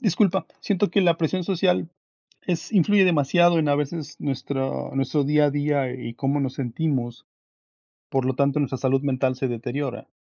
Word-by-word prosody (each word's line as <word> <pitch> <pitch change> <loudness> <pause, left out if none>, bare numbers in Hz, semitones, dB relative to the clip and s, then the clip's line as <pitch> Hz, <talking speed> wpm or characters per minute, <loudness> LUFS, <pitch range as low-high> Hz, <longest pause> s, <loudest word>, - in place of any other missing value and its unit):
Disculpa, 195 -3 +1
siento 200 -2 0
que 200 - +3
la 170 -3 +3
presión 175 +3 -1
social 180 -2 +1 0.6
es 175 +2 -3
influye 205 0 +4
demasiado 175 +1 +4
en 155 -2 +1
a 145 - +3
veces 150 +1 -4
nuestro 135 -1 -3
nuestro 140 +2 +1
día 150 +1 +3
a - - +3
día 145 -2 0
y 125 -2 -6
cómo 135 +4 -1
nos 135 -2 -2
sentimos, 130 -2 -3 0.8
por 135 -1 0
lo 130 0 0
tanto 140 +2 +1
nuestra 135 -2 -1
salud 135 +1 +1
mental 130 -2 0
se 130 - -1
deteriora. 125 +2 -4
145 Hz, 170 wpm, -24 LUFS, 135-170 Hz, 0.8 s, influye